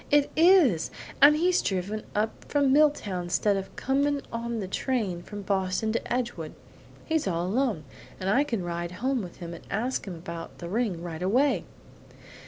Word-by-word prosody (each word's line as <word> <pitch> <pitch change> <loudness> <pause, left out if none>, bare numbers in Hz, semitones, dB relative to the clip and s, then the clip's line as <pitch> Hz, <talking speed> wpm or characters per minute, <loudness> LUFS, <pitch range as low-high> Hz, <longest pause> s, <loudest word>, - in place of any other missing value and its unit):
It 290 -1 +3
is; 320 - +5 0.3
and 295 +2 +8
he's 360 +2 +3
driven 195 +3 -2
up 215 +2 +1 0.2
from 280 -2 +3
Milltown 210 -12 +2
stead 205 +3 +2
of 195 0 -5
coming 280 +2 +1
on 235 0 -3
the 195 - -3
train 200 -5 -1
from 205 +2 -8
Boston 190 +2 0
to 230 - -3
Edgewood. 235 -11 -2 0.5
He's 320 -7 0
all 170 -1 0
alone, 220 - 0 0.4
and 185 - -3
I 245 +9 +4
can 230 -10 -2
ride 175 0 -4
home 255 +6 -1
with 180 -3 -8
him 170 -1 -7
and 170 - -10
ask 235 +3 -2
him 185 - -5
about 170 0 -8
the 170 - -7
ring 200 -5 -1
right 170 -1 -6
away!" 255 +10 +2
210 Hz, 175 wpm, -27 LUFS, 180-270 Hz, 0.5 s, and